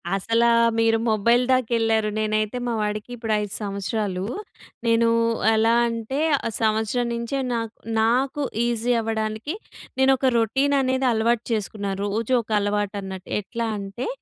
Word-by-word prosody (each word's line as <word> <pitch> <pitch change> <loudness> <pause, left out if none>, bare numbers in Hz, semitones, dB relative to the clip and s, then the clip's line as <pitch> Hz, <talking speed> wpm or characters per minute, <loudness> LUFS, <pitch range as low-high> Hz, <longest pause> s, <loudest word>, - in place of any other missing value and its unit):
అసలా 230 +4 +2 0.3
మీరు 225 0 +3
మొబైల్ 235 +3 +3
దాకెళ్ళారు. 225 -3 +2
నేనైతే 215 +2 0
మా 235 - 0
వాడికి 210 +2 -3
ఇప్పుడు 225 -2 -2
5 210 -1 -5
సంవత్సరాలు. 200 -1 -2 0.6
నేనూ 230 0 +3 0.5
ఎలా 225 +1 +3
అంటే, 230 +4 -3 0.3
ఆహ్, 225 - -4
సంవత్సరం 220 +2 +1
నించే 235 +4 -2
నాక్ 230 -1 -3 0.3
నాకు 265 +6 +1 0.2
ఈజీ 240 0 0
అవ్వడానికి, 220 - -3 0.4
నేనొక 265 -1 +4
రొటీననేది 265 +2 +1
అలవాటు 230 +1 +1
చేసుకున్నాను. 200 -2 -2
రోజూ 220 +5 -1
ఒక 225 - -21
అలవాటన్నట్టు. 200 -2 -3
ఎట్లా 230 +3 -4
అంటే, 200 +5 -5
225 Hz, 120 wpm, -23 LUFS, 210-240 Hz, 0.6 s, నేనొక